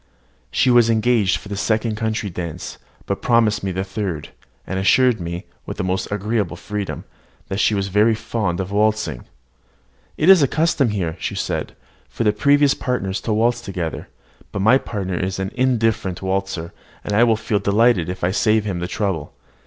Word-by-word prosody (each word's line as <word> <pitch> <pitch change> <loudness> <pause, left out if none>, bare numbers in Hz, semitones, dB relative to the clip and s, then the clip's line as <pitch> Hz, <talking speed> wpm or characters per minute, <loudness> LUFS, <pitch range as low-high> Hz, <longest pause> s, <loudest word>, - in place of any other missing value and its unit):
She 125 - +2
was 120 -2 +5
engaged 110 -3 +2
for 100 - -12
the 100 - -4
second 110 +2 0
country 110 -2 -2
dance, 85 -2 -6 0.3
but - - -3
promised 115 -3 +3
me 95 - -1
the 95 +1 -2
third, 95 -6 -4 0.4
and 95 - -3
assured 120 +2 +3
me, 85 +1 -5 0.2
with - - -5
the - - -2
most 95 +2 -2
agreeable 105 -3 -1
freedom, 105 +1 -5 0.5
that 95 - -2
she 105 - +3
was 100 -1 -1
very 105 +4 +3
fond 105 -5 -2
of 95 0 -3
waltzing. 105 - 0 0.9
"It 155 - +1
is 190 -1 +9
the 140 - +4
custom 155 -3 +1
here," 90 -5 -2
she - - -3
said, - - -3 0.3
"for 90 - -3
the 105 -2 +3
previous 145 +5 +4
partners 100 -7 -2
to 110 - -1
waltz 115 +2 +2
together; 90 -4 -4 0.4
but 100 - -2
my 125 +6 +6
partner 95 -7 -4
is 95 0 -2
an 95 +1 -3
indifferent 115 -8 0
waltzer, 95 -3 -2 0.3
and 105 +4 +3
will 115 - +4
feel 105 -1 -1
delighted 100 -4 +3
if 90 0 -6
I 90 - +2
save 110 +1 +2
him 95 -4 -2
the 90 - -3
trouble. 95 -7 -3
105 Hz, 180 wpm, -21 LUFS, 95-115 Hz, 0.9 s, is